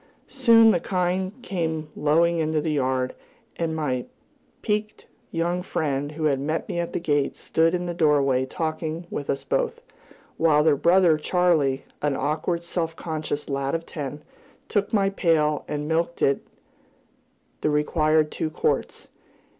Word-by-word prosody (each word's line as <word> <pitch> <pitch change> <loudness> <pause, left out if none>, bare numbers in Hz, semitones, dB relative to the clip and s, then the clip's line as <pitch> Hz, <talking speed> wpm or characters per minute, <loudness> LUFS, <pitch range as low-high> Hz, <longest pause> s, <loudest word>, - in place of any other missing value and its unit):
Soon 230 -4 +6
the 180 - +2
kine 185 +1 -1
came 160 -6 -2
lowing 165 +3 +2
into 155 -1 +1
the 155 +1 -1
yard, 130 -3 0 0.4
and 165 -1 -1
my 130 -6 -2 0.6
piquant 210 0 -2 0.2
young 175 +2 -1
friend 145 -4 -2
who 155 +1 -5
had 140 -3 +2
met 155 +4 -2
me 170 - -3
at 170 - -2
the - - -1
gate 145 -4 0
stood 165 +2 +1
in 180 0 -2
the 175 - -3
doorway 145 -5 +3
talking 160 +2 -3
with 145 - -4
us 135 0 -1
both, - - -1 0.5
while 150 -2 +4
their 155 -2 +4
brother 170 +1 +4
Charley, 155 -6 +1 0.2
an 145 -2 +1
awkward, 155 +5 -1
self 165 -1 -3
conscious 155 -3 -4
lad 140 +2 -1
of 165 0 -4
ten, 145 -1 -6 0.4
took 205 -2 0
my 195 -3 +2
pail 155 -5 +1
and 150 0 -3
milked 165 +2 -1
into - - +6
it - - -32 1.1
the - - +1
required 155 +1 +2
two 160 - -2
quarts. 155 - -2
160 Hz, 155 wpm, -24 LUFS, 150-170 Hz, 1.1 s, Soon